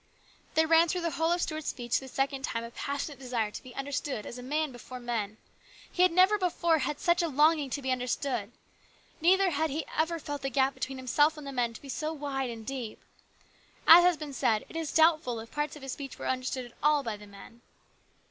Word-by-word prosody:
There 320 - +5
ran 325 +1 +5
through 360 +2 -1
the 335 -1 -1
whole 325 +3 +1
of 350 0 +1
Stuart's 310 -1 -4
speech 240 -3 -1
this 265 -1 -11
second 270 0 -1
time 230 -3 -2
a 230 - -8
passionate 280 +2 -4
desire 240 -5 -2
to - - -7
be 250 -1 -13
understood 275 -4 -3
as 250 - -7
a - - -7
man 300 +3 -1
before 250 +1 -9
men. 225 -4 -3 0.5
He 360 - 0
had 365 -1 +6
never 375 +4 +5
before 340 -3 +2
had 290 +2 -2
such 345 0 +2
a 340 - +1
longing 300 0 +3
to 280 +2 -4
be 260 - 0
understood. 250 -3 -2 0.7
Neither 375 +2 +4
had 320 0 0
he 300 +3 -3
ever 325 +2 +1
felt 290 -3 -5
the 270 - -2
gap 270 +1 +2
between 265 0 -4
himself 290 +5 +2
and 300 - -8
the 275 - -5
men 240 -3 -1
to - - -10
be - - -10
so 310 +3 -2
wide 275 -3 -3
and 225 -2 -7
deep. 255 -4 -5 0.9
As 345 +2 +10
has 355 -2 +4
been 295 -2 -7
said, 220 -4 +1
it - - -13
is 325 -2 -2
doubtful 310 -7 +3
if 225 +1 -10
parts 295 0 -2
of 295 - -11
his 270 - -5
speech 275 0 -7
were - - -5
understood 255 0 -2
at 240 - -14
all 300 -1 +3
by 225 -3 -3
the 205 0 -13
men. 200 +4 -14
280 Hz, 230 wpm, -29 LUFS, 250-315 Hz, 0.9 s, As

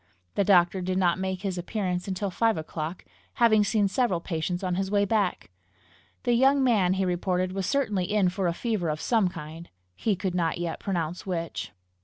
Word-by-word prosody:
The 200 - +2
doctor 185 -1 +4
did 185 +1 -1
not 180 -1 +2
make 190 0 -3
his 190 -3 -2
appearance 180 -1 -2
until 195 +1 -2
five 225 +3 +2
o'clock, 160 +2 -5 0.3
having 220 -3 +5
seen 205 0 +2
several 195 -4 +1
patients 175 +2 -3
on 180 -1 0
his 190 +1 -1
way 205 0 +2
back. 200 - 0 0.7
The 245 - +2
young 270 +3 +4
man, 205 -8 +3
he 190 0 0
reported, 180 +1 0
was 190 -1 -2
certainly 210 -9 0
in 205 -3 +3
for 185 0 -1
a 170 - +1
fever 215 -8 -1
of 150 0 -2
some 220 -1 +2
kind 165 -1 -8 0.3
he 215 - 0
could 185 0 -3
not 170 -2 0
yet 170 -1 -3
pronounce 175 -2 -3
which. 170 - -3
185 Hz, 190 wpm, -27 LUFS, 175-205 Hz, 0.7 s, having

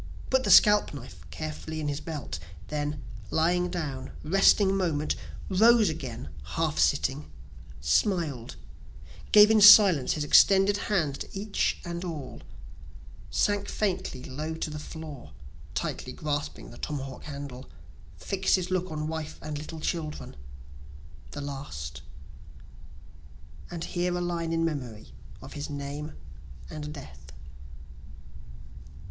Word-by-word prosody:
Put 260 0 +3
the 205 - -1
scalp 210 -3 +6
knife 140 - -10
carefully 155 0 -5
in 150 - -2
his 145 0 -2
belt 150 - -5 0.3
then 150 -2 -3 0.3
lying 180 +2 +2
down, 145 -7 -4
resting 195 +3 +4
moment, 160 -6 0 0.3
Rose 220 +2 +5
again, 130 -6 -6
half 160 -2 -2
sitting, 140 0 +1 0.5
smiled, 140 - 0 0.8
gave 210 +1 +8
in 220 -1 +5
silence 200 - +8
his 155 - -2
extended 195 +6 +5
hand 160 -9 0
to - - -6
each 205 0 0
and 170 0 -4
all, 150 - -6 0.9
Sank 205 -1 +1
faintly 185 -10 -2
low 155 +5 -5
to 160 -1 -4
the 150 - -5
floor 150 -4 -9 0.4
(tightly - - -3
grasping 145 -1 -4
the - - -12
tomahawk 135 -3 -5
handle,) 140 -3 -7 0.5
Fix'd 195 -1 +1
his 185 -1 -3
look 185 0 0
on 155 -1 -3
wife 155 -1 -5
and 150 -1 -5
little 160 +2 -7
children 155 -1 -4 0.9
the 145 - -6
last: 75 - -6 1.7
(And 170 -1 -5
here 175 0 -1
a - - -2
line 170 -2 -2
in 165 0 +1
memory 120 - -5 0.3
of - - -10
his 145 +1 -5
name 145 +1 -5 0.6
and 150 -1 -6
death.) 70 - -11
155 Hz, 125 wpm, -28 LUFS, 140-180 Hz, 1.7 s, gave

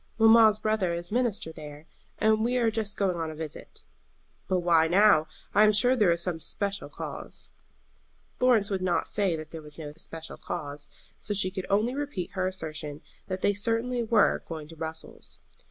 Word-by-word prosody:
"Mamma's 225 -1 +7
brother 215 -5 0
is 175 +2 -6
minister 230 -8 0
there, 150 -1 -10 0.3
and 220 +1 +3
we 245 +2 +1
are 230 -2 +2
just 215 -2 -3
going 190 -3 +1
on 165 -1 -2
a 155 - -7
visit." 155 -1 -8 0.6
"But 185 -1 +1
why 165 -2 +4
now? 180 -3 +5 0.3
I 205 - +6
am 215 - +6
sure 245 +5 +4
there 210 -7 +4
is 170 0 +2
some 175 -2 -1
especial 200 +4 -3
cause." - - -7 0.9
Florence 235 -5 +4
would 190 -1 -1
not 185 -2 +1
say 195 -5 +1
that 155 -1 -8
there 160 - -7
was 150 -1 -13
no 155 -2 -6
especial 160 +1 -8
cause, 145 -1 -6 0.3
so 205 - -3
she 185 -1 +1
could 190 -1 -5
only 215 +5 +2
repeat 280 -10 -4
her 185 -1 -1
assertion 155 -5 -5 0.3
that 185 -1 -4
they 205 - +4
certainly 230 +4 -1
were 225 -2 +3
going 160 -3 -6
to 165 - -11
Brussels. 160 0 -6
190 Hz, 185 wpm, -28 LUFS, 160-215 Hz, 0.9 s, Mamma's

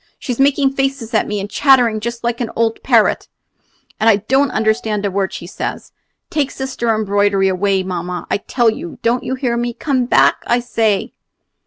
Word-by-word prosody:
She's 250 -1 -5
making 275 0 +3
faces 270 -4 -2
at 215 - +2
me, 210 0 -2
and 200 - -4
chattering 245 -1 +3
just 235 +2 -5
like 235 +1 -1
an 235 - -2
old 225 -1 0
parrot, - - +2 0.7
and 220 +1 +4
I 220 - +6
don't 265 +7 +1
understand 220 -2 0
a 200 - -1
word 195 0 -1
she - - -7
says. 180 - -6 0.4
Take 295 -5 0
Sister 265 -3 -4
Embroidery 205 -2 +1
away, 190 +1 +1
mamma, 180 -1 -4
I - - +2
tell 230 +3 +1
you! 170 -6 -8
Don't 235 +2 +1
you 260 - -2
hear 255 -3 -1
me? 240 0 -2
Come 265 -4 0
back, - - +3
I 240 - +2
say!" 225 -4 0
225 Hz, 185 wpm, -17 LUFS, 205-250 Hz, 0.7 s, I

